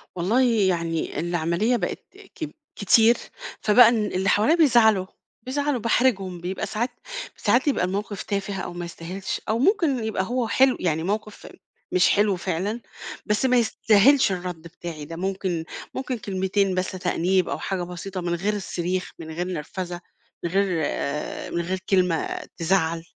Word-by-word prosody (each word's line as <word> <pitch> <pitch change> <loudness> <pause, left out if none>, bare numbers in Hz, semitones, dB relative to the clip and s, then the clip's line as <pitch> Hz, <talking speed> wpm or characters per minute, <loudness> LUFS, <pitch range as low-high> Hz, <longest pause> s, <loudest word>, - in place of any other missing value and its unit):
والله 195 +9 +2 0.3
يعني 170 -2 -1
العملية 175 +7 0
بقت 175 - -4 0.3
كب 315 - -5 0.2
كتير، 225 +3 +5 0.4
فبقى 225 +2 +7
إن 220 -3 +1
اللي 190 -1 0
حواليّا 255 +11 +4
بيزعلوا، 230 - +5 0.4
بيزعلوا، 285 0 -1
باحرِجهم، 200 -6 +1
بيبقى 180 +2 -3
ساعات 235 +4 -2 0.5
ساعات 245 +4 +2
بيبقى 275 -10 +2
المَوقِف 200 +2 -3
تافه 200 0 -3
أو 175 - -6
ما 175 0 -5
يستاهلش، 175 +3 -5
أو 225 +2 +1
ممكن 320 - +2
يبقى 210 -4 -1
هو 245 +3 -1
حلو 260 +2 +4
يعني 160 -2 0
مَوقِف 210 +2 -4 0.4
مش 185 0 +4
حلو 205 -1 +3
فعلًا 190 +6 -2 0.4
بس 210 +4 +1
ما 250 -1 +4
يستاهلش 225 +2 +4
الرد 180 -3 -4
بتاعي 165 -2 -8
ده، 165 +2 -8
ممكن 185 -2 -2 0.3
ممكن 260 -2 -3
كلمتين 195 -1 0
بس 185 0 -1
تأنيب 185 0 0
أو 140 - -3
حاجة 190 -2 -2
بسيطة 180 +1 -6
من 175 0 -1
غير 200 +5 -1
الصريخ، 185 -2 -3
من 160 -1 -7
غير 175 +3 -3
نرفزة، 175 +1 -5 0.4
من 170 - -1
غير 190 -4 +1
آآ 145 +2 -3
من 170 - -1
غير 185 +2 -2
كلمة 180 -4 +1 0.2
تزعَّل. 165 -1 +1
190 Hz, 155 wpm, -24 LUFS, 175-220 Hz, 0.5 s, فبقى